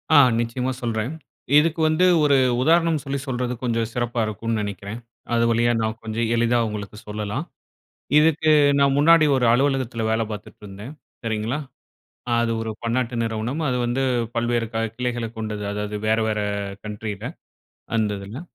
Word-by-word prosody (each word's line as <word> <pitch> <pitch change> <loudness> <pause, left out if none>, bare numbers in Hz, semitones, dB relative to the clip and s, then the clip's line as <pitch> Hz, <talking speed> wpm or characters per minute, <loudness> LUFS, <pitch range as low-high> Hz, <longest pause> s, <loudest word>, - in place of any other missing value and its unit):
ஆ, - - +9 0.2
நிச்சயமா 125 +2 -1
சொல்றேன். 115 +1 -2 0.5
இதுக்கு 160 +2 +3
வந்து 155 +4 +3 0.2
ஒரு 145 -1 +4 0.3
உதாரணம் 165 +1 +3
சொல்லி 140 -1 -3
சொல்றது 125 -1 -2
கொஞ்சம் 115 -2 0
சிறப்பா 120 -1 -2
இருக்கும்னு 110 +1 -2
நெனைக்கிறேன். 100 +2 -5 0.3
அது 115 0 +3
வழியா 120 +1 +3
நான் 110 0 -2
கொஞ்சம் 110 +1 -1
எளிதா 120 +1 +2
உங்களுக்கு 105 -1 -6
சொல்லலாம். 105 +7 -3 0.7
இதுக்கு, 155 0 +4 0.3
நான் 140 -1 +4
முன்னாடி 160 +2 +6
ஒரு 125 -2 +2
அலுவலகத்துல 130 -3 0
வேல 110 +1 +1
பாத்துட்ருந்தேன், 105 +2 -9 0.3
சரிங்களா. 115 +4 -2 0.8
அது 115 0 +1
ஒரு 110 0 -3
பன்னாட்டு 120 +1 -1
நிறுவனம். 115 +6 -2
அது 125 -1 0
வந்து 120 +3 -1 0.3
பல்வேறு 120 0 0
கா 115 - -1 0.2
கிளைகளைக் 120 -2 -3
கொண்டது. 105 -2 -4
அதாவது 105 0 -3
வேற 110 +1 +3
வேற 105 -1 0 0.5
கண்ட்ரில, 105 -1 -5 0.7
அந்ததுல. 105 +3 -2
115 Hz, 140 wpm, -23 LUFS, 110-130 Hz, 0.8 s, ஆ